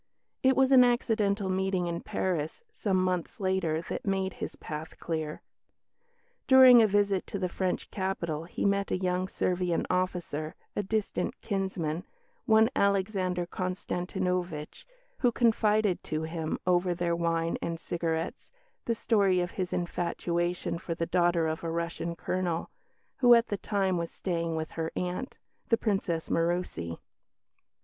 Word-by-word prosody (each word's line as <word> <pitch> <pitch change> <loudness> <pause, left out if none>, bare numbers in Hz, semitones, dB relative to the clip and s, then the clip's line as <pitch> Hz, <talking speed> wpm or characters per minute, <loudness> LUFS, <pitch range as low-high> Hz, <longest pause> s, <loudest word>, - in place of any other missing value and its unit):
It 265 0 +4
was 265 0 +4
an 255 -2 +9
accidental 215 -5 +1
meeting 190 -1 0
in 170 0 -3
Paris, 165 - -2
some 200 - 0
months 185 -2 -1
later, 185 -4 0
that - - -5
made 190 -2 0
his - - -6
path 155 +1 -7
clear. 160 -2 -3 1.0
During 260 -2 +9
a 220 - +5
visit 200 -2 +1
to - - -4
the 185 -2 -1
French 185 0 -2
capital 170 -5 -2
he 175 - -3
met 200 0 +1
a - - +1
young 185 0 0
Servian 180 -2 0
officer, 175 -4 -2 0.2
a - - +1
distant 210 +1 -2
kinsman, 185 -4 -2 0.4
one 220 +1 +5
Alexander 190 -3 +1
Konstantinovitch, 180 -2 -3 0.3
who 245 - +3
confided 215 -4 +2
to 155 0 -2
him, 160 -1 -3
over 180 0 +2
their 170 -1 0
wine 165 0 0
and 165 -1 -3
cigarettes, 165 -1 -3 0.4
the 230 - 0
story 200 -5 +3
of 175 0 -1
his 185 -2 -3
infatuation 175 0 -1
for 170 -1 -4
the 165 - -1
daughter 175 -2 +2
of 160 +1 -3
a 165 - -2
Russian 170 0 -3
colonel, 175 -1 -2 0.5
who 245 -2 +7
at 235 0 +2
the 205 - -1
time 190 -3 0
was 170 -1 -3
staying 170 -3 -2
with 160 0 -3
her 165 0 -3
aunt, 180 +8 -3 0.3
the 230 - +4
Princess 195 -7 -1
Murussi. 165 - -1
180 Hz, 145 wpm, -29 LUFS, 170-200 Hz, 1.0 s, an